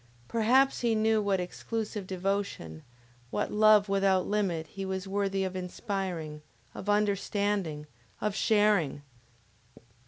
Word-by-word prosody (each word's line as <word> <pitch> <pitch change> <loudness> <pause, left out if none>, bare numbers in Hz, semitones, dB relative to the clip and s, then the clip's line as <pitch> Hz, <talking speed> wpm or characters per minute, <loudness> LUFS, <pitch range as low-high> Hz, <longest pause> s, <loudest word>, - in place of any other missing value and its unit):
Perhaps 255 +4 +3
he 235 -2 +2
knew 220 0 +3
what 200 -2 +1
exclusive 210 +2 -4
devotion, 190 - -3 0.5
what - - -2
love 210 -1 +5
without 195 -2 +2
limit 190 -6 0
he 195 +5 -7
was 190 0 -3
worthy 195 0 0
of 185 -1 -3
inspiring, 180 -4 -4 0.3
of 205 - -6
understanding, 200 -5 0 0.3
of 210 -1 -1
sharing! 205 - +2
200 Hz, 115 wpm, -29 LUFS, 185-210 Hz, 0.5 s, love